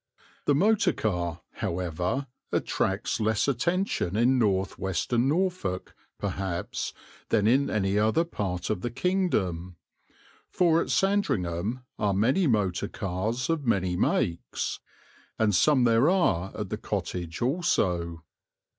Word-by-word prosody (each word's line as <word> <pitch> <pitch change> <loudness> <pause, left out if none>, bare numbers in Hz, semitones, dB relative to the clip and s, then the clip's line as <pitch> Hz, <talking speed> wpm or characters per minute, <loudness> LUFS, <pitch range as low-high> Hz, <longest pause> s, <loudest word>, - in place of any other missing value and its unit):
The 145 - +3
motor 195 +1 +3
car, 85 -5 -2
however, 90 - -2 0.3
attracts 95 +4 0
less 110 +2 +1
attention 140 - 0
in 125 +3 +4
north 95 -4 +1
western 105 +7 0
Norfolk, 165 - -1 0.2
perhaps, 95 -3 -3 0.4
than 105 - +2
in 135 +5 +3
any 100 -1 +1
other 110 +10 +3
part 95 - -3
of 90 - -2
the 120 - -2
kingdom; 110 - -1 0.7
for 170 -2 +3
at - - -4
Sandringham 115 - 0 0.2
are 100 -2 +1
many 130 - +3
motor 105 -7 +1
cars 105 +7 -2
of 160 -5 -1
many 95 -5 +1
makes, 85 -1 -1 0.6
and 110 -2 +2
some 135 +6 +4
there 115 +5 +4
are 95 - +2
at - - -4
the - - -1
Cottage 85 -2 -4
also. 90 - 0
110 Hz, 120 wpm, -27 LUFS, 90-140 Hz, 0.7 s, in